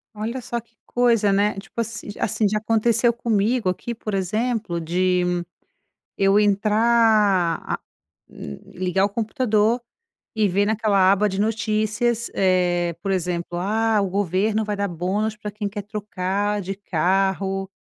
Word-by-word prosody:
Olha 225 Hz, +4 st, -4 dB
só 240 Hz, -1 st, -3 dB
que 230 Hz, 0 st, -20 dB
coisa, 230 Hz, -4 st, +2 dB
né. 205 Hz, +1 st, +2 dB
Tipo 195 Hz, +4 st, -8 dB
assi 230 Hz, -1 st, -6 dB
assim, 215 Hz, 0 st, +1 dB
já 210 Hz, +2 st, 0 dB
aconteceu 230 Hz, +2 st, +2 dB
comigo 225 Hz, -1 st, +1 dB
aqui, 235 Hz, +6 st, -4 dB
por 215 Hz, -1 st, -6 dB
exemplo, 210 Hz, 0 st, -1 dB
de 180 Hz, +2 st, +1 dB, 0.9 s
eu 195 Hz, +1 st, +4 dB
entrar 210 Hz, -3 st, +3 dB
a -, -, -2 dB, 0.5 s
li 70 Hz, -1 st, -9 dB, 0.2 s
ligar 190 Hz, +2 st, +2 dB
o -, -, +2 dB
computador 220 Hz, +1 st, +1 dB, 0.6 s
e 215 Hz, -1 st, +3 dB
ver 200 Hz, +2 st, +1 dB
naquela 205 Hz, -3 st, +3 dB
aba 205 Hz, +1 st, +2 dB
de 190 Hz, 0 st, -4 dB
notícias, 220 Hz, +2 st, 0 dB
eh, 175 Hz, -2 st, +1 dB
por 195 Hz, -, -1 dB
exemplo: 175 Hz, -1 st, -2 dB
"Ah, 215 Hz, +3 st, +1 dB
o 195 Hz, -, -1 dB
governo 205 Hz, +3 st, 0 dB
vai 210 Hz, -1 st, -2 dB
dar 200 Hz, 0 st, -1 dB
bônus 195 Hz, +5 st, -2 dB
para 210 Hz, -1 st, -6 dB
quem 205 Hz, 0 st, -4 dB
quer 205 Hz, 0 st, -6 dB
trocar 205 Hz, -1 st, -2 dB
de 195 Hz, 0 st, -4 dB
carro. 195 Hz, +1 st, 0 dB
205 Hz, 145 wpm, -22 LUFS, 190-220 Hz, 0.9 s, eu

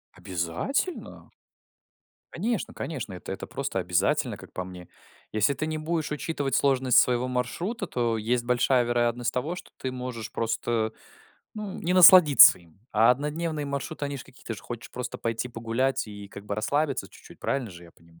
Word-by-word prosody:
Обязательно! 90 Hz, -, -3 dB, 1.0 s
Конечно, 220 Hz, +4 st, -2 dB
конечно, 135 Hz, -9 st, -5 dB
это 90 Hz, -, -8 dB
это 95 Hz, -, -6 dB
просто -, -, -3 dB
обязательно, -, -, 0 dB
как -, -, -14 dB
по 90 Hz, -, -3 dB
мне. 90 Hz, -1 st, -10 dB, 0.4 s
Если 110 Hz, +6 st, +2 dB
ты 155 Hz, +3 st, -3 dB
не 155 Hz, 0 st, -2 dB
будешь 155 Hz, 0 st, -2 dB
учитывать 145 Hz, -2 st, -2 dB
сложность 130 Hz, -3 st, +3 dB
своего 125 Hz, +1 st, +4 dB
маршрута, 170 Hz, -, -3 dB
то 120 Hz, -7 st, 0 dB
есть 120 Hz, +3 st, 0 dB
большая 125 Hz, +1 st, +2 dB
вероятность 120 Hz, 0 st, 0 dB
того, 145 Hz, +8 st, -2 dB
что -, -, -11 dB
ты 130 Hz, -, -4 dB
можешь 125 Hz, -3 st, -6 dB
просто, 115 Hz, -1 st, -1 dB, 0.6 s
ну 210 Hz, -3 st, -6 dB
не 175 Hz, -, -1 dB
насладиться 180 Hz, -, +9 dB
им. 85 Hz, 0 st, -22 dB
А 115 Hz, +3 st, +5 dB
однодневные 150 Hz, +3 st, -2 dB
маршруты- 140 Hz, +2 st, -4 dB
они 140 Hz, 0 st, -3 dB
ж -, -, -9 dB
какие, 125 Hz, -, -19 dB
ты 115 Hz, -, -4 dB
же -, -, -12 dB
хочешь 120 Hz, -1 st, -8 dB
просто 125 Hz, -1 st, -6 dB
пойти 115 Hz, +2 st, -2 dB
погулять 115 Hz, +3 st, -1 dB
и 105 Hz, -1 st, -9 dB
как 100 Hz, 0 st, -11 dB
бы 105 Hz, -, -3 dB
расслабиться 140 Hz, +6 st, -1 dB
чуть-чуть, -, -, -16 dB
правильно 130 Hz, -6 st, -2 dB
же 90 Hz, -1 st, -12 dB
я 85 Hz, -, -15 dB
понима 85 Hz, 0 st, -23 dB
125 Hz, 170 wpm, -26 LUFS, 110-150 Hz, 1.0 s, насладиться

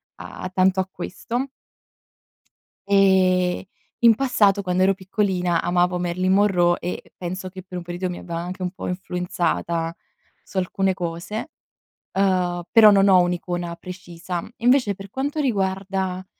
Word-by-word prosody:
a 185 Hz, -, -7 dB
tanto 185 Hz, 0 st, +3 dB
a 190 Hz, -, 0 dB
questo 240 Hz, +9 st, -4 dB, 1.4 s
ehm, 185 Hz, -2 st, +3 dB, 0.4 s
in 235 Hz, -1 st, +7 dB
passato 210 Hz, -7 st, +3 dB
quando 185 Hz, -1 st, +1 dB
ero 195 Hz, +1 st, +4 dB
piccolina, 185 Hz, -3 st, 0 dB
amavo 180 Hz, 0 st, +2 dB
Marylin 180 Hz, +1 st, 0 dB
Monroe 185 Hz, -3 st, +3 dB
e 180 Hz, -, -6 dB
penso 185 Hz, +1 st, -5 dB
che 185 Hz, -1 st, -10 dB
per 180 Hz, -1 st, -8 dB
un -, -, -9 dB
periodo 175 Hz, +1 st, -4 dB
mi -, -, -8 dB
abbia 170 Hz, -2 st, -6 dB
anche 180 Hz, +2 st, -5 dB
un 180 Hz, -, -1 dB
po' 185 Hz, -, -7 dB
influenzata 175 Hz, -2 st, -2 dB, 0.5 s
su 195 Hz, -, -9 dB
alcune 190 Hz, +1 st, +1 dB
cose, 175 Hz, -, -5 dB, 0.6 s
uhm, 180 Hz, -2 st, +1 dB
però 220 Hz, -2 st, +8 dB
non 200 Hz, -1 st, +5 dB
ho 185 Hz, -2 st, +7 dB
un'icona 175 Hz, -1 st, -2 dB
precisa. 175 Hz, -1 st, -6 dB
Invece 240 Hz, -4 st, +3 dB
per 195 Hz, 0 st, -11 dB
quanto 285 Hz, +3 st, -2 dB
riguarda, 190 Hz, -6 st, -1 dB
185 Hz, 140 wpm, -23 LUFS, 175-195 Hz, 1.4 s, però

